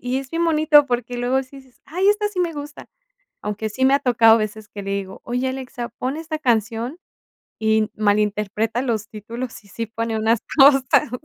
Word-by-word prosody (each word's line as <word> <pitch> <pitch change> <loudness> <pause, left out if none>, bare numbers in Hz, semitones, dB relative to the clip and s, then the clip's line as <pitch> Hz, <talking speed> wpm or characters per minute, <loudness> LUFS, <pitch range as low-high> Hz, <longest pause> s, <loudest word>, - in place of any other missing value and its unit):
y 250 +1 -1
es 270 - -7
bien 335 +1 0
bonito, 305 -3 +5
porque, 245 -1 -2
luego 250 +2 +1
sí 275 +1 -14
dices: 260 -2 -20
"Ay, 365 +6 0
esta 415 0 +2
sí 400 -3 -3
me 345 -2 0
gusta". 295 0 -9 0.6
Aunque 210 +1 -2
sí 260 +5 -3
me 265 +1 +5
ha 280 - +4
tocado, 230 -2 +5
veces 215 0 -4
que 205 -1 -8
le 195 - -4
digo: 195 -1 -4
"Oye 250 +2 -1
Alexa, 260 -2 -6
pon 260 +3 -2
esta 315 0 -4
canción", 235 - -1 0.6
y 220 0 +2
malinterpreta 210 +2 0
los 225 -4 -2
títulos 230 +3 -7
y 200 - -20
sí 230 +3 -5
pone 225 0 -3
unas 220 +1 +2 0.2
cosas. 270 -1 +5
245 Hz, 190 wpm, -21 LUFS, 220-275 Hz, 0.6 s, bonito